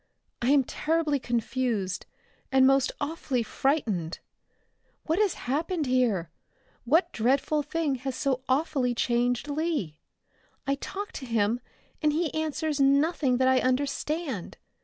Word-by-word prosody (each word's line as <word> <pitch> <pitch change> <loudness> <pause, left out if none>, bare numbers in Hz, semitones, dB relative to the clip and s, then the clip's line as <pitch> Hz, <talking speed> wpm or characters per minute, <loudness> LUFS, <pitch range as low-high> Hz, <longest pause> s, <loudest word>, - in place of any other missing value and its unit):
"I 240 - +1
am 280 -1 +5
terribly 305 +1 0
confused, 235 -5 -1 0.4
and 265 -1 +5
most 270 0 +4
awfully 285 -5 -1
frightened. 215 - -1 0.9
What 325 +4 0
has 415 -4 +2
happened 315 +5 -1
here? 235 - +1 0.5
What 330 +7 +3
dreadful 270 +6 +2
thing 295 0 -1
has 265 -1 -3
so 265 -2 0
awfully 260 -3 +1
changed 245 +2 +1
Lee? 290 - -2 0.7
I 275 - +1
talk 390 +8 -5
to 265 - -7
him 225 0 +1 0.4
and 305 -1 +3
he 320 0 0
answers 315 -1 -1
nothing 280 -1 +3
that 260 0 +3
I 260 0 +5
understand. 275 - -1
270 Hz, 125 wpm, -27 LUFS, 245-305 Hz, 0.9 s, am